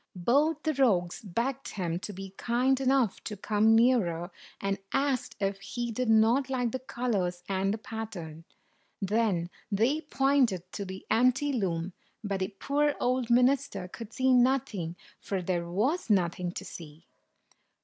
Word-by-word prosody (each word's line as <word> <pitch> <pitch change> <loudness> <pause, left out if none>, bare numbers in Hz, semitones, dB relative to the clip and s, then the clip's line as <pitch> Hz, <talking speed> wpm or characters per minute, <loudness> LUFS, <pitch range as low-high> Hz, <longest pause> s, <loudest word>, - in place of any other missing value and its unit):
Both 285 - +2
the 315 - +1
rogues 195 -11 +2
begged 235 +7 -2
him 175 -4 -2
to 205 - -6
be 195 0 -8
kind 255 +4 +1
enough 260 -5 +2
to 210 - -5
come 215 +2 +3
nearer, 195 -8 +2 0.3
and 195 0 -1
asked 270 -3 0
if 195 -1 -1
he 235 +4 -4
did 245 +1 -1
not 230 +5 +4
like 245 -3 0
the 260 - -3
colors 200 -9 -2
and 195 0 0
the 215 - -1
pattern. 210 -9 -7 0.6
Then 195 -4 0 0.2
they 235 +10 +2
pointed 270 - +2
to 200 - -5
the 190 0 -8
empty 255 +5 +3
loom, 180 -6 -1 0.3
but 200 -2 -2
the 185 - 0
poor 285 +9 0
old 250 -1 0
minister 250 -4 +2
could 225 +4 -9
see 260 +2 +2
nothing, 240 -9 +2 0.2
for 195 - -3
there 175 -1 -2
was 235 - 0
nothing 180 -3 +1
to - - -6
see. 160 0 -10
220 Hz, 150 wpm, -29 LUFS, 190-255 Hz, 0.6 s, not